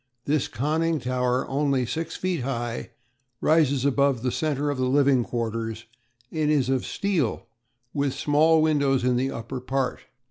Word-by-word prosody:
This 150 -1 +1
conning 160 +4 0
tower, 125 0 0
only 135 -2 +1
six 165 +6 -4
feet 185 -3 -1
high, 120 -2 -3 0.5
rises 145 -4 +3
above 140 -3 +2
the 125 - 0
centre 145 -1 -1
of 140 - -4
the 130 0 +1
living 135 -2 +4
quarters, 115 -1 -3 0.5
and 155 -2 0
is 140 -4 +2
of 130 -2 0
steel 180 - -1 0.5
with 140 -2 0
small 155 +2 +3
windows 140 -4 +2
in 125 0 +2
the 130 +2 0
upper 115 +2 -5
part. 130 0 -1
135 Hz, 150 wpm, -25 LUFS, 125-150 Hz, 0.5 s, living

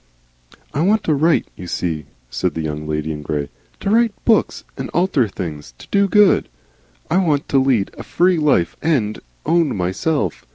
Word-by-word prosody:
"I 145 - 0
want 210 +5 +3
to 155 - +1
write, 155 +3 +2
you 90 - -9
see," 80 -4 -3 0.2
said - - -1
the 80 - -2
Young 75 0 -4
Lady 75 0 -2
in 75 -1 -5
Grey, 75 -1 -3 0.3
"to 200 - -1
write 230 -1 +3
Books 225 -3 +2
and - - -5
alter 170 - +2
things. 75 -10 -7
To - - -13
do 200 0 +3
Good. 210 0 +4 0.6
I 175 - +3
want 155 -7 +1
to 135 - +4
lead 130 -7 +1
a - - -4
Free 180 -1 +2
Life 140 - +2
and 125 -10 0 0.3
Own 165 -3 +2
myself. 95 - -1
140 Hz, 175 wpm, -19 LUFS, -, 0.6 s, Good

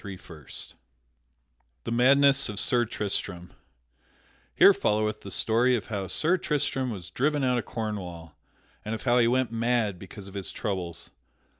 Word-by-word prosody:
PART 95 -4 -10
III 75 -5 -13 1.4
The - - -5
Madness 135 +3 +5
of 105 -1 -4
Sir 120 -1 +1
Tristram 90 -5 -4 1.1
_Here - - +8
followeth 105 0 0
the 100 - -9
story 115 +6 +2
of 110 - -5
how 100 -3 -3
Sir 170 - +2
Tristram 145 -5 -1
was 90 -6 -7
driven 145 +6 0
out 125 -1 +2
of 110 - -6
Cornwall 90 -8 -6 0.5
and 110 +1 -3
of 110 - -8
how 125 -1 +3
he 115 - +4
went 125 -1 +1
mad 115 -4 0
because 95 +1 -11
of 95 - -11
his 100 -2 -4
troubles. 90 -6 -5
110 Hz, 155 wpm, -27 LUFS, 95-125 Hz, 1.4 s, Here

